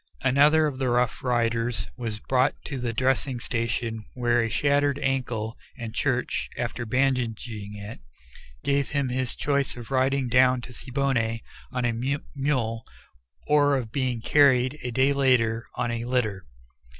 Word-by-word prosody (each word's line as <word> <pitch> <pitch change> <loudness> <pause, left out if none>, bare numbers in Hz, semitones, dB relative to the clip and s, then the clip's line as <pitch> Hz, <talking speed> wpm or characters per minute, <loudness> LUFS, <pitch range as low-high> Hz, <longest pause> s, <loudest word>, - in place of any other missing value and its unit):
Another 145 +4 +5
of 140 -3 -3
the 130 -2 +1
Rough 120 -1 +1
Riders 115 -1 0
was 115 -4 -4
brought 130 +4 +2
to 140 -3 -4
the 120 -1 -2
dressing 130 +1 0
station 115 -1 -2
with 120 -1 +1
a 115 -1 +2
shattered 140 +3 +2
ankle, 125 -5 -2 0.2
and 115 -3 -6
Church, 130 -3 -1
after 120 0 -3
bandaging 115 -5 -1
it, 105 -3 -8 0.6
gave 140 -1 +1
him 140 -3 0
his 130 0 -2
choice 140 -3 0
of 120 +1 -9
riding 135 0 +2
down 125 +1 +4
to 125 - -10
Siboney 125 -4 -1 0.3
on 125 -1 -1
a 120 - +1
mule, 130 -2 -2 0.6
or 145 -1 +4
of 115 -4 -4
being 125 -3 -1
carried, 135 +1 +4
a 125 - -3
day 130 +4 +3
later, 120 -4 +2
on 120 - -1
a 115 0 -3
litter. 110 -6 -1
125 Hz, 150 wpm, -26 LUFS, 115-135 Hz, 0.6 s, Another